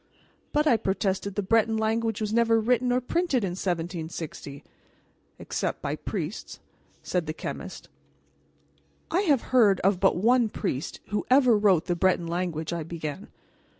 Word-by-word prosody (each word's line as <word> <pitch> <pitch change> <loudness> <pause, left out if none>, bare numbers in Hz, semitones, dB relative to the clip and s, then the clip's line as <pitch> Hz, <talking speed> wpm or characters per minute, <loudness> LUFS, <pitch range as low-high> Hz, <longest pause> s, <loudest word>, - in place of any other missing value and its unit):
"But," 300 +1 +2
I 255 -7 +4
protested, 195 -1 -1
"the 205 - -1
Breton 225 +2 +2
language 225 0 0
was 215 0 -2
never 230 -1 +3
written 245 +2 +1
or 250 - +3
printed 270 - 0
in 190 - -1
1760." 165 -5 -5 0.7
"Except - - -3
by 140 +1 -3
priests," 175 +3 -5 0.4
said 175 -3 -1
the 155 - -2
chemist. - - -7 1.2
"I 340 - +2
have 290 - +3
heard 210 -7 +5
of 195 -1 +2
but 195 0 +3
one 235 +4 +3
priest 135 -7 -4
who 210 -1 -1
ever 255 -3 +5
wrote 200 -6 +3
the 175 - 0
Breton 180 -1 +2
language," 170 -1 -3
I 170 - -2
began. 160 +3 -6
200 Hz, 150 wpm, -26 LUFS, 175-230 Hz, 1.2 s, heard